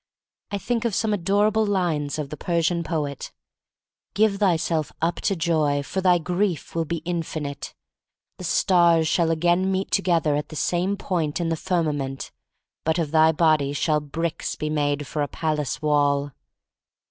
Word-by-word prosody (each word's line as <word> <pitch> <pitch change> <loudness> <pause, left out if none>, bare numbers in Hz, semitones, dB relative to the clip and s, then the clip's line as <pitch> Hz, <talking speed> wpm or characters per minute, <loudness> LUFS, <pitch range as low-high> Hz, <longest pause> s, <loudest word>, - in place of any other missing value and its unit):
I 200 - -2
think 235 +3 -2
of 230 -5 0
some 220 -2 +1
adorable 205 +3 +2
lines 170 -8 0
of 150 -3 -4
the - - -4
Persian 170 +2 0
poet: 150 -5 -3 0.8
"Give 210 -1 +3
thyself 170 -5 +1
up 165 +2 0
to 195 - 0
Joy, 155 -4 +1
for 190 +6 -3
thy 180 -1 +4
Grief 175 0 -2
will 165 -1 -1
be 165 0 -4
infinite. 155 -4 -4 0.6
The - - -7
stars 170 -2 +3
shall 165 +1 +2
again 175 +3 +2
meet 190 +1 -2
together 170 -6 +2
at 150 - -3
the 155 - -9
same 180 +5 0
point 170 -6 -2
in 170 -1 -1
the 165 - 0
firmament, 150 -6 -2 0.5
but 160 +1 +1
of 160 -4 -1
thy 160 0 +5
body 155 -3 +2
shall 150 +1 +1
bricks 165 +3 -3
be 155 0 -3
made 145 -1 0
for 150 +3 -3
a 145 - 0
palace 155 -1 -2
wall." 145 -1 +2
165 Hz, 160 wpm, -24 LUFS, 150-180 Hz, 0.8 s, thy